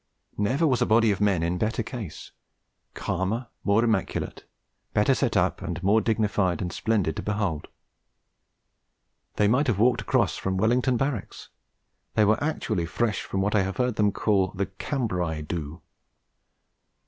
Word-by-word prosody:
Never 130 +10 +2
was 130 -6 +2
a - - +3
body 110 0 +4
of 100 - -2
men 100 -5 +2
in 85 +1 -1
better 110 +1 0
case 115 -7 -7 0.6
calmer, 110 +6 -2
more 100 +3 +3
immaculate, 110 -5 -1 0.5
better - - +4
set - - 0
up, - - +1 0.2
more 105 +4 +4
dignified 105 -5 +1
and 90 -3 -3
splendid 100 -9 0
to - - -2
behold. 100 -7 -2 1.7
They 105 - +3
might 130 +7 +2
have 115 -6 +1
walked 120 +3 +3
across - - +1
from 95 0 -2
Wellington 120 +4 +2
Barracks; 135 -5 -3 0.7
they 105 - +5
were 110 +6 +2
actually 110 - -1
fresh 110 +3 -1
from 95 - -3
what 105 +2 0
I 105 - +4
have 95 +3 -3
heard 125 -3 0
them 105 -1 +2
call 100 -2 +2
'the 100 +1 0
Cambrai 90 - -2
do.' 80 +1 -5
105 Hz, 150 wpm, -26 LUFS, 95-115 Hz, 1.7 s, they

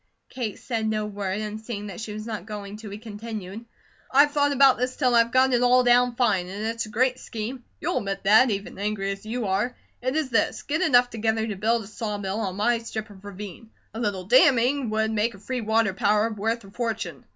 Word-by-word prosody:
Kate 235 -6 -4
said 225 -3 -2
no 215 -1 -1
word, 200 -1 -3
and 215 0 -5
seeing 210 -4 -6
she 220 -1 -5
was 215 +1 -6
not 215 -4 -5
going 205 -1 -6
to, 215 -1 -9
he 200 - -7
continued: 215 -1 -7 0.5
"I've 285 +2 +5
thought 285 0 +2
about 275 -2 +5
this 255 +1 -1
till 250 -4 +2
I've 235 0 +4
got 260 0 +4
it 245 - +3
all 250 0 +5
down 245 0 +4
fine, 195 -8 +1
and 200 +3 -5
it's 230 0 -2
a - - -11
great 255 +4 +1
scheme; 240 +2 -6 0.2
you'll 345 +4 0
admit 195 -1 -4
that, 220 +6 +6
even 200 -2 -4
angry 200 -1 -1
as 195 +2 -7
you 235 +1 -2
are. 205 +6 0 0.3
It 255 +3 -1
is 310 -5 -1
this: 225 - +1
get 310 +2 -1
enough 245 -1 +4
together 220 0 0
to 215 -3 -4
build 225 +4 +1
a - - -11
saw 215 -1 -4
mill 195 +1 -3
on 195 -4 -2
my 230 +4 +2
strip 220 -2 -6
of 195 -1 -15
ravine. 205 +1 -9 0.2
A 225 - -6
little 205 -5 -1
damming 255 +4 +4
would 220 0 0
make 220 +1 0
a - - -14
free 250 +5 -3
water 220 -2 +2
power 210 +3 +2
worth 225 +2 -2
a 195 - -14
fortune. 225 -1 -4
220 Hz, 225 wpm, -25 LUFS, 205-245 Hz, 0.5 s, that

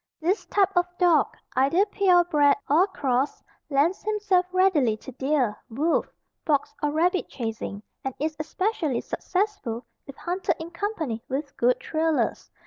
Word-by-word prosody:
This 360 +6 0
type 390 -2 +2
of 355 0 +3
dog, 345 -5 +4 0.3
either 280 +10 +3
pure 380 -4 +4
bred 295 -4 +3
or 330 +7 +4
crossed 270 -6 -1 0.3
lends 295 +6 +2
himself 410 -4 +1
readily 345 - +3
to 265 - -10
deer, 265 -4 0
wolf, 295 +9 +1 0.4
fox 290 -3 +1
or 295 - +1
rabbit 350 +5 +1
chasing, 220 -4 -5 0.2
and 265 -1 -3
is 310 +2 -2
especially 315 - -1
successful 365 - -2 0.2
if 275 - -9
hunted 360 +2 -1
in 325 +1 -7
company 335 - -3
with 280 +2 -3
good 245 +1 +2
trailers. 320 0 -1
315 Hz, 140 wpm, -25 LUFS, 270-370 Hz, 0.4 s, dog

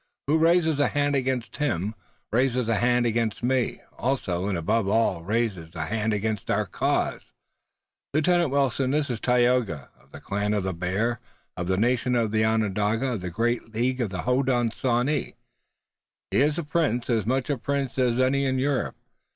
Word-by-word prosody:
"Who 155 +3 +2
raises 165 -2 +3
a 145 - +4
hand 145 0 +1
against 130 -3 -1
him 110 - -1 0.4
raises 125 0 +1
a 115 -2 +1
hand 120 +1 +2
against 115 -1 -1
me 125 -1 0 0.2
also, 100 -8 -1
and 100 -3 -1
above 100 +5 0
all 105 -5 +1
raises 95 -5 -2
a 80 -1 -2
hand 110 +3 -1
against 105 0 -2
our - - +1
cause. - - -1 0.9
Lieutenant 170 +2 +2
Wilton, 135 -1 +1
this 145 -1 0
is 115 - -3
Tayoga, 120 - +1
of - - -26
the - - -10
Clan 105 +1 -1
of 100 - 0
the 95 0 -2
Bear, 100 +7 -1 0.4
of 90 0 -4
the 95 0 +1
nation 125 +3 +1
Onondaga, 110 +1 +1
of 110 - -4
the 90 - -4
great 115 +3 -2
League 125 +3 0
of 115 - 0
the 95 -1 -4
Hodenosaunee. 125 +1 0 1.0
He - - +1
is 150 +2 +2
a 170 - -1
prince, 145 -6 0
as 110 -4 0
much 130 +3 0
a - - +1
prince 140 -1 -2
as 125 -1 +2
any 135 +2 +2
in 130 0 0
Europe. 135 +1 0
120 Hz, 170 wpm, -25 LUFS, 105-135 Hz, 1.0 s, a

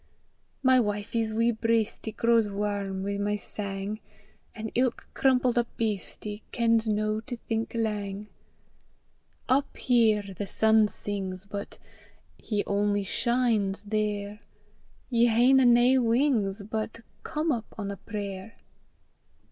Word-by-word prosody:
My 260 -1 +6
wifie's 220 +1 -1
wee 230 +2 +2
breistie 225 -1 0
Grows 230 -2 +3
warm 200 -1 -2
wi' 200 0 -2
my 205 +1 0
sang, 200 0 -4 0.6
An' 220 -1 -5
ilk 250 -1 0
crumpled 255 -2 +3
up 235 - 0
beastie 210 -1 -3
Kens 230 -1 +2
no 215 0 0
to 245 +2 -7
think 225 0 -3
lang. 210 -2 -2 1.2
Up 275 +2 +1
here 215 -5 +2
the 200 +2 -4
sun 220 +1 +4
sings, 195 -2 -5
but 200 0 -6 0.6
He 210 -2 -2
only 205 0 +1
shines 220 -2 0
there! 210 -1 -2 0.7
Ye 235 0 +4
haena 250 +3 +5
nae 245 +2 +5
wings, 230 -5 +1
but 220 +2 -4 0.2
Come 310 +1 -1
up 230 -5 -3
on 200 -2 -3
a 200 - -6
prayer. 200 +1 -6
215 Hz, 120 wpm, -27 LUFS, 205-235 Hz, 1.2 s, My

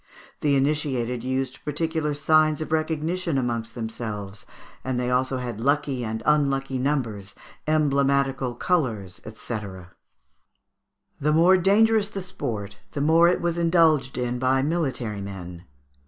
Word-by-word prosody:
The 145 -2 +2
initiated 135 -4 0
used 130 +1 -3
particular 150 0 -1
signs 155 0 +3
of 155 - -5
recognition 160 +1 -1
amongst 115 -2 -2
themselves, 110 -4 -6 0.4
and 130 -1 -2
they 125 0 -1
also 130 +1 +1
had 120 -3 -5
lucky 140 -2 +1
and 110 0 -4
unlucky 135 -3 +1
numbers, 115 -8 -2 0.3
emblematical 140 -4 +1
colours, 115 - -1
&c. 110 +1 -5 1.6
The 150 +2 +1
more 170 +4 +6
dangerous 205 +3 +3
the 195 -3 -5
sport 105 - -5
the 140 - -2
more 165 +3 +5
it 175 - +2
was 170 0 -1
indulged 165 -5 +3
in 125 0 -2
by 130 +1 +2
military 130 -10 -2
men. 90 -3 -8
135 Hz, 125 wpm, -24 LUFS, 120-155 Hz, 1.6 s, more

